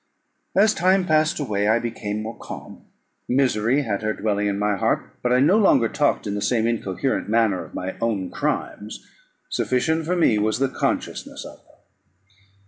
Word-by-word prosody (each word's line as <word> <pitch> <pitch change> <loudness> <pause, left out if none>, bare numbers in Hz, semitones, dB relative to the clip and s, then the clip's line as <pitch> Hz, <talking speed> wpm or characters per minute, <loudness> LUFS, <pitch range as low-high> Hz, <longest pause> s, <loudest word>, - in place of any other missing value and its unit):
As 210 +2 +5
time 185 +1 +2
passed 155 +1 +2
away 105 -7 -1
I 110 +2 +4
became 110 -3 -4
more 110 +1 -6
calm: - - -10 0.4
misery 125 0 +2
had 100 -6 -2
her 110 0 -1
dwelling 105 -1 -1
in 100 -1 -1
my 105 0 +1
heart, - - -1
but 125 - 0
I 125 - +4
no 170 +11 +4
longer 130 - +4
talked 145 +1 0
in 100 - -2
the 105 - -3
same 110 +2 +1
incoherent 115 +1 -1
manner 110 -4 +2
of - - -13
my 95 +1 -4
own 105 -5 -1
crimes; 105 +1 -3 0.5
sufficient 160 +5 0
for 180 - +1
me 120 -11 +3
was 110 +1 +1
the 135 +1 +1
consciousness - - -3
of - - -11
them. - - -24
115 Hz, 175 wpm, -23 LUFS, 105-140 Hz, 0.5 s, As